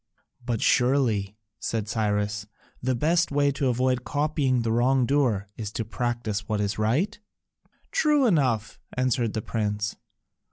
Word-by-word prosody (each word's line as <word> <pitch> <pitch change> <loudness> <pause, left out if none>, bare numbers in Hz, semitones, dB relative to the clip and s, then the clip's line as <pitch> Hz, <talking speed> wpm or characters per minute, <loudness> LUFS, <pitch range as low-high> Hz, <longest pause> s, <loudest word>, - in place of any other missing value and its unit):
"But 120 -2 -1
surely," 120 -6 +2 0.2
said 110 -2 -2
Cyrus, 105 -2 -1 0.3
"the 130 +1 0
best 165 +7 +2
way 145 0 +3
to 140 0 -1
avoid 125 0 +1
copying 145 -4 0
the 115 - 0
wrongdoer 125 -3 +2
is 105 -3 -5
to 115 - -2
practise 115 -3 -3
what 105 -1 0
is 105 +1 -1
right?" 155 - +1 0.7
"True 300 - +3
enough," 130 - +1 0.2
answered 125 -3 +1
the 110 - -3
prince. 105 -2 -2
120 Hz, 130 wpm, -26 LUFS, 105-135 Hz, 0.7 s, way